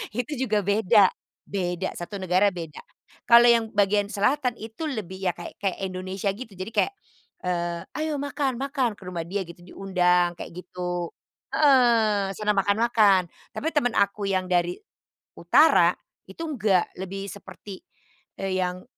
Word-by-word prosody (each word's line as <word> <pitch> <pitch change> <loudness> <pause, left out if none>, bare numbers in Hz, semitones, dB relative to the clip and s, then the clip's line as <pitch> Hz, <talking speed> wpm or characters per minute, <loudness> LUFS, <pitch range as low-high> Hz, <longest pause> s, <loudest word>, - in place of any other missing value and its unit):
Itu 245 +5 -2
juga 215 -5 +1
beda, 205 0 +4 0.3
beda 180 -1 -2
satu 175 +4 -7
negara 185 +2 +2
beda, 165 -5 -8 0.5
kalau 235 0 +8
yang 230 -1 +2
bagian 205 0 +2
selatan 250 +4 +1
itu 220 +7 -8
lebih 195 - -5
ya 180 - +3
kayak 175 - -9
kayak 195 -2 -1
Indonesia 185 +1 -3
gitu. 215 -2 -10
Jadi 185 +4 -6
kayak, 395 - +1 0.5
eee, 175 -1 -2
"Ayo 310 0 -2
makan 280 -2 -2
makan," 265 -4 -1
ke - - -15
rumah 180 -2 -4
dia 195 +2 -2
gitu 170 +1 -13
diundang 180 -1 +1
kayak 175 - -8
gitu, 180 -1 -5 0.4
heeh, 230 -8 +4
sana 210 +1 0
makan-makan. 200 -2 +3 0.3
Tapi 315 - -4
temen 245 -5 +2
aku 200 +1 +1
yang 185 -2 0
dari 175 -1 +1 0.6
utara - - +5 0.3
itu 330 - -7
enggak, 215 - +1 0.2
lebih 195 +1 -5
seperti 200 -1 -11 0.6
yang 185 -1 -2
200 Hz, 140 wpm, -25 LUFS, 180-230 Hz, 0.6 s, kalau